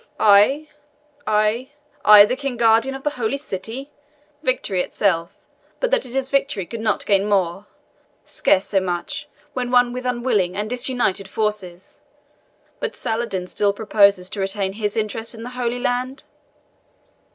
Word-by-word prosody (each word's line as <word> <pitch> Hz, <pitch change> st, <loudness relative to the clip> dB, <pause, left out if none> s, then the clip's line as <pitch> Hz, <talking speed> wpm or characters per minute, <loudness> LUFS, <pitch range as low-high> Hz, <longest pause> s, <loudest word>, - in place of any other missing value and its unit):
"I 215 Hz, +9 st, +5 dB, 0.6 s
I 215 Hz, +4 st, +1 dB, 0.3 s
I 210 Hz, -1 st, +9 dB
the 250 Hz, -, -1 dB
King 270 Hz, -2 st, -4 dB
Guardian 230 Hz, +3 st, +3 dB
of 270 Hz, -, -9 dB
the 295 Hz, -, 0 dB
Holy 225 Hz, +5 st, 0 dB
City! 260 Hz, +3 st, -6 dB, 0.5 s
Victory 235 Hz, -, 0 dB
itself, 170 Hz, -5 st, -1 dB, 0.4 s
but -, -, -1 dB
that -, -, +1 dB
it 245 Hz, -, -8 dB
is 270 Hz, 0 st, -1 dB
victory, 275 Hz, -8 st, 0 dB
could 230 Hz, +7 st, -7 dB
not 220 Hz, -1 st, -1 dB
gain 200 Hz, 0 st, +2 dB
more 195 Hz, 0 st, 0 dB, 0.6 s
scarce 190 Hz, -, +2 dB
so 195 Hz, -, +1 dB
much, 180 Hz, +10 st, -4 dB, 0.3 s
when 250 Hz, -2 st, -2 dB
won 245 Hz, -1 st, +3 dB
with 255 Hz, 0 st, -4 dB
unwilling 240 Hz, -7 st, 0 dB
and 210 Hz, +1 st, -2 dB
disunited 245 Hz, -6 st, -1 dB
forces. 195 Hz, -4 st, -4 dB, 0.8 s
But -, -, -3 dB
Saladin 220 Hz, -5 st, -3 dB
still 200 Hz, +2 st, 0 dB
proposes 200 Hz, -3 st, +3 dB
to 205 Hz, -, -5 dB
retain 195 Hz, 0 st, -2 dB
his 210 Hz, +1 st, -3 dB
interest 220 Hz, +2 st, -3 dB
in 225 Hz, -, -9 dB
the 245 Hz, -, -6 dB
Holy 245 Hz, -1 st, -2 dB
Land?" 250 Hz, +2 st, -2 dB
220 Hz, 150 wpm, -21 LUFS, 200-250 Hz, 0.8 s, I